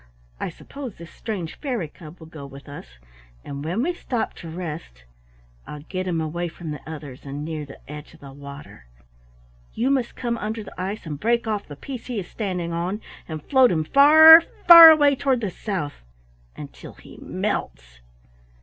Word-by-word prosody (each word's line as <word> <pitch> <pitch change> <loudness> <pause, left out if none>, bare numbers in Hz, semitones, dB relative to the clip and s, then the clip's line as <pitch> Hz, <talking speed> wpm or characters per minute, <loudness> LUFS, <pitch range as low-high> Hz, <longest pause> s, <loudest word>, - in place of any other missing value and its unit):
I - - -3
suppose 270 -7 -9
this 170 0 -12
strange 190 -8 -6
fairy 245 - -3
cub 155 +2 -14
will 160 - -13
go 155 -3 -10
with 140 +1 -13
us, 60 - -11 0.5
and 140 0 -7
when 180 +10 -2
we 350 +4 -1
stop 245 -8 -3
to 165 - -9
rest 160 - -7 0.6
I'll 150 - -8
get 185 +3 -5
him 170 -2 -1
away 165 +2 -3
from 165 -1 -8
the 150 - -7
others 145 -5 -9
and 145 +1 -6
near 155 -2 -5
the 135 - -12
edge 150 +1 -10
of - - -20
the 140 -1 -12
water. 140 - -12 0.9
You 250 +5 0
must 260 -4 -1
come 235 -2 -3
under 220 +1 -4
the - - -12
ice 190 +2 -5
and 150 -3 -6
break 235 +3 +1
off 210 -2 -3
the 145 - -9
piece 250 - -8
he 245 -4 -3
is 180 - -7
standing 180 -6 -4
on, 180 +5 -3 0.3
and 155 -2 -7
float 260 -2 +4
him 160 -3 0
far, 315 - +9 0.3
far 335 -2 +12
away 290 -3 +5
toward 265 -2 0
the 210 -5 -3
South 175 -7 -5 0.6
until - - -10
he - - -16
melts." - - -4
175 Hz, 185 wpm, -23 LUFS, 150-235 Hz, 0.9 s, far